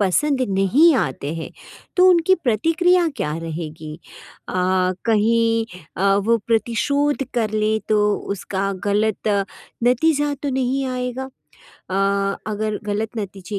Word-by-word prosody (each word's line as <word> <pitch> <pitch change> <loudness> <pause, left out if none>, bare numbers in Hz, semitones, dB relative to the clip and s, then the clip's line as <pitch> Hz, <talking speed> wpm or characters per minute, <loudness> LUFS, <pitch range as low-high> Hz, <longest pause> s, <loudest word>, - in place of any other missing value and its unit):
पसंद 260 +9 +1
नहीं 210 - +4
आते 140 +3 -4
हैं, 160 - -6 0.5
तो 365 0 +6
उनकी 360 +1 +5
प्रतिक्रिया 335 - +2
क्या 150 +1 -2
रहेगी? 155 -1 -6 0.5
अ, - - -5 0.5
कहीं 225 +1 +2 0.3
अ, 195 +2 +3
वो 230 - +4
प्रतिशोध 280 +6 +1
कर 225 -3 0
लें, 215 0 +1
तो 210 -1 +3 0.2
उसका 195 0 -3
ग़लत 210 +1 0 0.6
नतीजा 290 +4 +2
तो 285 - -1
नहीं 265 +1 0
आएगा? 255 +1 -4 0.6
अ 185 - -2 0.5
अगर 215 0 -2
ग़लत 215 +2 -3
नतीजे 200 0 -5
225 Hz, 120 wpm, -21 LUFS, 200-275 Hz, 0.6 s, तो